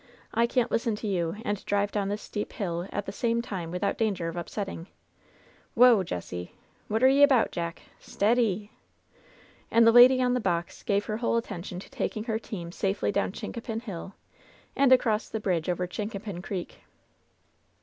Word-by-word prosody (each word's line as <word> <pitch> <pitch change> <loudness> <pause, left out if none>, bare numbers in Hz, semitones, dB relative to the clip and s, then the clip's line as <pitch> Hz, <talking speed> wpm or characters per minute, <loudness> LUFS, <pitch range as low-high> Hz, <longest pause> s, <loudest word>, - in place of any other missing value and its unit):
I 235 +1 +3
can^t 245 -1 0
listen 230 -1 0
to 215 +1 -5
you 175 -3 -1
and 205 -1 -2
drive 205 0 0
down 200 -2 -1
this 205 +1 -3
steep 210 - -5
hill 175 -2 -3
at 205 - -3
the - - -4
same 230 +2 0
time 190 -8 -4
without 180 +4 -2
danger 200 -7 0
of 165 - -5
upsetting 175 0 -5
I - - -31 0.9
Whoa, 240 -3 +7
Jessie 90 - -5
I - - -32 0.3
What 220 +3 0
y're 275 +2 +7
'bout. 260 -5 +3
Jack? 170 0 -4 0.2
Stea— 210 +3 +1
dee 210 -4 0 0.5
!" - - -28
And 230 0 +5
the 230 - +7
lady 250 +2 +8
on 250 -1 +2
the 250 - +1
box 175 -5 -2
gave 205 -2 0
her 215 - -2
whole 230 0 +1
attention 180 -5 -5
to - - -13
taking 215 - -3
her 220 -1 -2
team 175 -7 -7
safely 195 +3 -1
down 200 -1 0
Chincapin 225 +2 -5
Hill 195 -3 -7 0.6
and 275 -1 +4
across 230 -4 +3
the 220 - -3
bridge 180 -5 -1
over 180 0 0
Chincapin 200 -1 -5
Creek. 185 -2 -6
205 Hz, 185 wpm, -27 LUFS, 180-230 Hz, 0.9 s, lady